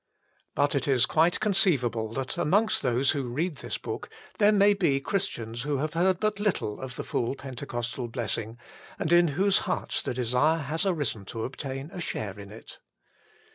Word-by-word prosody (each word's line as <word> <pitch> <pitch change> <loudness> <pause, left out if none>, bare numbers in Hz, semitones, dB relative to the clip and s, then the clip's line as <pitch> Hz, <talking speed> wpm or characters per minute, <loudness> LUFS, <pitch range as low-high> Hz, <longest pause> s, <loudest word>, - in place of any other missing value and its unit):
But 145 0 +2
it 140 -2 0
is 130 -3 +4
quite 165 +4 +2
conceivable 145 - +2
that 135 -1 -3
amongst 205 +8 +2
those 125 +2 +2
who 140 -5 -2
read 155 +5 -2
this - - -4
book - - -6 0.3
there 210 0 +6
may 205 0 +5
be 170 -9 +2
Christians 120 - -2
who 145 +1 -1
have 150 +2 -2
heard 180 +2 +2
but 215 -1 0
little 195 - -1
of 130 -1 -6
the - - -4
full 120 +3 -1
Pentecostal 125 -2 -5
blessing, 115 -1 -3 0.4
and 160 - -2
in 175 0 +6
whose 195 +1 +4
hearts 180 - -1
the 125 - -3
desire 130 +6 +2
has 160 +7 -1
arisen 145 - -1
to 110 +3 -5
obtain 135 +3 -5
a 180 - -5
share 105 - -4
in 100 0 -10
it. 110 - -12
140 Hz, 175 wpm, -27 LUFS, 120-175 Hz, 0.4 s, there